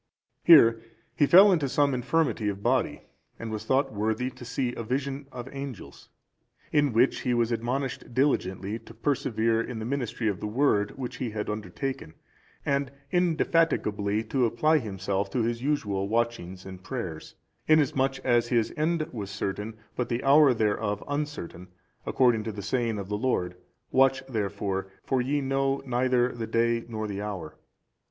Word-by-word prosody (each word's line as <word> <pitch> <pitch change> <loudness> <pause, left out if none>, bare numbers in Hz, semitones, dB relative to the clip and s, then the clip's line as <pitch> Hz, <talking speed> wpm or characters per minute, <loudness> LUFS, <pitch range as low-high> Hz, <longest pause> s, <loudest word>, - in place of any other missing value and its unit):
Here 115 -9 +7 0.3
he 145 - +3
fell 195 +6 +8
into 155 -7 +1
some 145 +1 +2
infirmity 125 -3 0
of 100 0 -5
body, - - +1 0.3
and 115 -1 -6
was 110 -1 -5
thought 135 -1 +1
worthy 110 +5 -1
to 125 - -12
see 125 0 -2
a - - -5
vision 135 +4 -3
of 125 -1 -7
angels; 135 -5 -8 0.6
in 145 -2 +3
which 120 +4 +3
he 125 - 0
was 120 0 +1
admonished 125 +2 -2
diligently 110 -6 0
to 115 0 -15
persevere 115 -3 0
in 115 0 -5
the 110 - -4
ministry 125 -3 -2
of 100 -4 -1
the 105 - -3
Word 105 -3 +1
which 130 -2 -5
he 125 - -3
had 105 -1 -3
undertaken, 105 - -5 0.5
and 140 -1 0 0.2
indefatigably 155 - +1
to 125 +2 +1
apply 155 +7 +2
himself 100 -3 -2
to 120 +1 0
his 115 +1 -1
usual 105 -9 -1
watching 115 -5 -1
and 95 -1 -10
prayers; 90 -12 -6 0.3
inasmuch 135 -3 +3
as 120 -2 +3
his 115 -2 +1
end 155 0 0
was 105 -5 -5
certain, 105 +2 -4 0.2
but 125 -1 -2
the 120 +1 -2
hour 140 +1 +6
thereof 105 -2 0
uncertain, 145 - -4 0.4
according 120 -4 +3
to 110 - -3
the 100 -1 -7
saying 115 0 -1
of 100 +1 -5
our 105 - -1
Lord, 90 -8 0 0.4
"Watch 135 0 +3
therefore, 100 -5 -3
for 130 -2 +1
ye 140 +3 0
know 135 0 0
neither 125 0 +2
the 115 -2 -5
day 115 +1 +1
nor 110 -2 -4
the 100 -1 -4
hour." 95 -7 -5
120 Hz, 160 wpm, -27 LUFS, 105-135 Hz, 0.6 s, fell